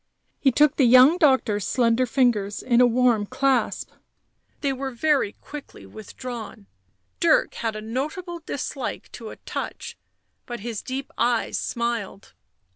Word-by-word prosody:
He 270 - +3
took 295 +3 +3
the 270 - +5
young 255 +8 +7
doctor's 260 - +3
slender 240 +3 +2
fingers 225 -6 +1
in 245 -1 +3
a 250 - +7
warm 240 -3 +2
clasp; 265 +1 0 0.7
they 280 - 0
w 270 +1 -4
re 260 - -7
very 285 -5 +1
quickly 295 -1 -11
withdrawn. 225 -1 -8 0.5
Dirk - - +3
had 225 -2 -3
a 215 - -5
notable 305 - -4
dislike 285 -4 -5
to 225 -2 -8
a - - -9
touch, - - -6 0.5
but 240 -4 -6
his 225 -1 -4
deep 265 +1 -5
eyes 240 -1 +1
smiled. 235 - -3
250 Hz, 140 wpm, -24 LUFS, 230-270 Hz, 0.7 s, young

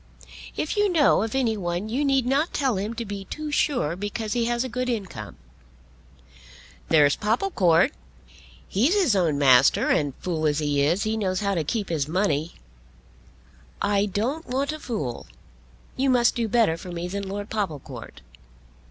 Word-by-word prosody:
If 310 - -2
you 415 -1 +3
know 310 - +4
of 225 +3 -3
any 240 -4 +1
one 175 0 -3
you 250 +6 -1
need 270 -3 +2
not 280 +6 +1
tell 265 -7 +1
him 210 +4 -3
to 235 - -4
be 200 -1 -6
too 305 +5 -6
sure 245 - +1
because 205 +3 -4
he 235 -1 0
has 240 +1 0
a - - -3
good 250 +1 -3
income." 190 - -5 1.5
"There's 145 -3 +5
Popplecourt. 210 - +2 0.8
He's 260 - +2
his 350 - +3
own 165 -6 +2
master, 135 -2 +5
and, 145 -3 +1
fool 160 -3 -2
as 145 -1 +1
he 145 -2 0
is, 170 +8 +2
he 220 +1 -1
knows 185 -3 -1
how 200 -1 0
to 165 -4 0
keep 205 +7 -2
his 150 -4 -1
money." 165 -2 0 1.2
"I 205 0 +1
don't 245 - -2
want 275 +3 -1
a 310 - -6
fool. 150 - -4 0.7
You 270 +1 +1
must 245 -2 +4
do 235 -2 -1
better 215 -7 +2
for 180 +2 -9
me 175 0 -4
than 200 +1 -4
Lord 205 +1 -5
Popplecourt." 195 -10 -5
205 Hz, 170 wpm, -25 LUFS, 170-250 Hz, 1.5 s, There's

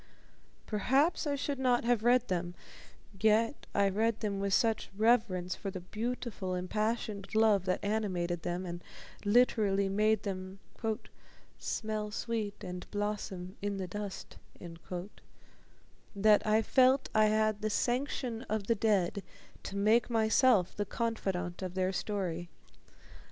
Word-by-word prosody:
Perhaps 270 - +1
I 285 - +1
should 280 0 -3
not 250 -2 +2
have 240 -2 +2
read 245 +1 +4
them 175 -1 -2 0.6
yet 220 +5 +2
I 200 0 +4
read 220 +3 0
them 205 -3 -2
with 200 0 -1
such 225 +2 +2
reverence 210 -6 +2
for 200 - -5
the 190 -1 -5
beautiful, 215 -1 -4
impassioned 210 +2 -2
love 215 -4 +4
that 185 - -1
animated 185 -5 -1
them, 175 +2 -3
and 175 0 -6 0.4
literally 205 -3 +3
made 215 +2 +2
them 190 -1 -5 1.0
"smell 215 -1 -3
sweet 210 -2 -3
and 180 0 -7
blossom 205 -2 -4
in 200 0 -2
the 190 - -3
dust," 205 +1 -6 1.8
that 210 +1 +4
I 215 +1 +4
felt 260 +2 +4
I 215 0 +5
had 215 0 +2
the 215 - 0
sanction 245 0 -1
of 215 -1 -1
the 230 - +3
dead 200 -3 +1 0.4
to 195 - -7
make 215 +4 +3
myself 225 -3 +3
the 205 - -1
confidant 195 -6 -2
of 185 -1 -5
their 185 0 0
story. 180 -5 -3
210 Hz, 130 wpm, -32 LUFS, 190-225 Hz, 1.8 s, I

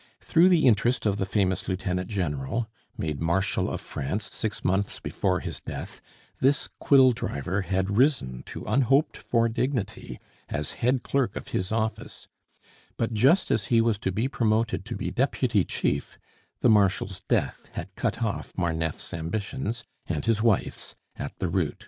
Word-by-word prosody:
Through 175 +3 +4
the 170 -5 +4
interest 120 +1 +3
of 100 -2 +2
the 95 - -1
famous 95 -2 0
lieutenant 90 -1 -2
general 90 - -2 0.3
made 75 -2 -3
marshal 95 +4 +1
of - - -4
France 95 +10 -4
six 110 - -4
months 95 +2 0
before - - -1
his - - -4
death - - -7 0.4
this 135 +2 +2
quill 135 -2 +6
driver 95 - -2
had 95 0 -1
risen 105 - +2
to - - -7
unhoped 135 - +3
for 115 -1 +1
dignity 115 - -2 0.3
as 75 0 -2
head 125 +1 +2
clerk 130 -7 0
of - - -6
his 95 +2 -2
office; 110 0 -3 0.7
but 115 0 -1
just 135 - +4
as 105 -4 +1
he 115 +2 +3
was 115 -3 +2
to 95 - -1
be 110 +7 0
promoted 110 -5 0
to - - -4
be 90 - -3
deputy 120 -2 +2
chief, 70 -4 -2 0.4
the 125 - +5
marshal's 95 -2 +3
death - - 0
had - - -6
cut - - -1
off - - -2
Marneffe's 80 -3 -2
ambitions 105 +8 -3 0.2
and 75 -4 -2
his 115 -2 +2
wife's 115 -3 0 0.2
at - - -6
the - - -1
root. 85 -3 0
105 Hz, 160 wpm, -27 LUFS, 90-120 Hz, 0.7 s, quill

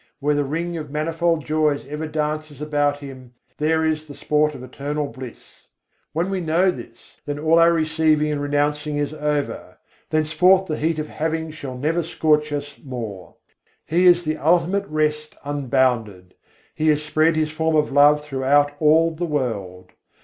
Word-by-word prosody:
Where 145 +1 +1
the 145 0 +1
ring 165 +5 -3
of 150 -2 -6
manifold 160 +1 -1
joys 155 -2 0
ever 150 +3 -5
dances 155 -1 -3
about 145 -1 0
Him, 130 -3 -11 0.2
there 160 +1 +1
is 155 0 -1
the 145 - -10
sport 150 +1 +1
of 125 - -9
Eternal 145 +3 -4
Bliss. 125 0 -12 0.4
When 175 +4 -1
we 190 -1 -1
know 170 +3 +2
this, - - -13
then 145 0 -3
all 160 +2 +3
our 170 0 +6
receiving 155 -2 +2
and 145 -1 -2
renouncing 145 +1 -1
is 145 0 -2
over; 150 -1 -3 0.3
Thenceforth 160 +5 +3
the 155 -4 -3
heat 160 +1 0
of 155 0 -3
having 160 +1 -3
shall 140 -5 -7
never 160 +6 0
scorch 150 -2 +1
us 145 -1 -5
more. 110 - -7 0.5
He 175 +3 +3
is 175 0 +5
the 155 -1 -2
Ultimate 180 +5 +1
Rest 150 0 -1
unbounded: 125 -10 -1 0.4
He 155 - -1
has 150 -1 +3
spread 155 +2 +2
His 155 -1 0
form 160 0 0
of 150 -2 +2
love 145 +1 +5
throughout 145 +1 +2
all 160 +2 +4
the 165 +2 -4
world. 100 - -3
150 Hz, 165 wpm, -22 LUFS, 145-160 Hz, 0.5 s, our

